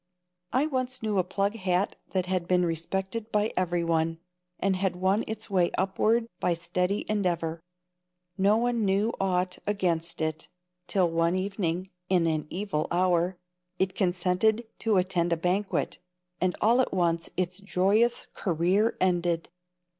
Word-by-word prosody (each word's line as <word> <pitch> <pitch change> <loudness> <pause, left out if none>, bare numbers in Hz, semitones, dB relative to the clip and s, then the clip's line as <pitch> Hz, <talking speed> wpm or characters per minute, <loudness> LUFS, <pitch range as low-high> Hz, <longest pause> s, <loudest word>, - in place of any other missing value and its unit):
I 260 +4 +2
once 255 -4 -2
knew 210 -3 +1
a - - +3
plug 200 +3 -1
hat 185 -1 0 0.2
that 185 -2 +1
had 185 -2 -1
been 180 0 +3
respected 190 +7 -3
by 210 +1 +1
everyone, 165 -2 +1 0.4
and 195 -1 +1
had 185 -1 0
won 190 +4 +1
its 220 - -5
way 185 -4 +2
upward 215 +5 +2
by 175 - +1
steady 180 +4 -1
endeavor. 170 -6 -1 0.7
No 200 +3 +4
one 235 -1 +1
knew 200 +3 +2
aught 185 -1 0
against 170 -4 0
it 155 0 -2 0.4
till 185 -3 +2
one 165 +1 +2
evening, 185 -1 -2 0.2
in 180 -3 +3
an 155 -2 0
evil 185 -4 -2
hour, 180 0 +2 0.4
it 190 0 0
consented 185 +5 +1
to 220 -3 +2
attend 180 -2 +1
a - - 0
banquet, 185 +4 -1 0.4
and 185 0 +1
all 235 +4 +5
at - - -1
once 170 -2 +1
its 180 +1 -1
joyous 200 +4 +2
career 185 +5 +1
ended. 175 -2 +1
185 Hz, 145 wpm, -28 LUFS, 175-205 Hz, 0.7 s, all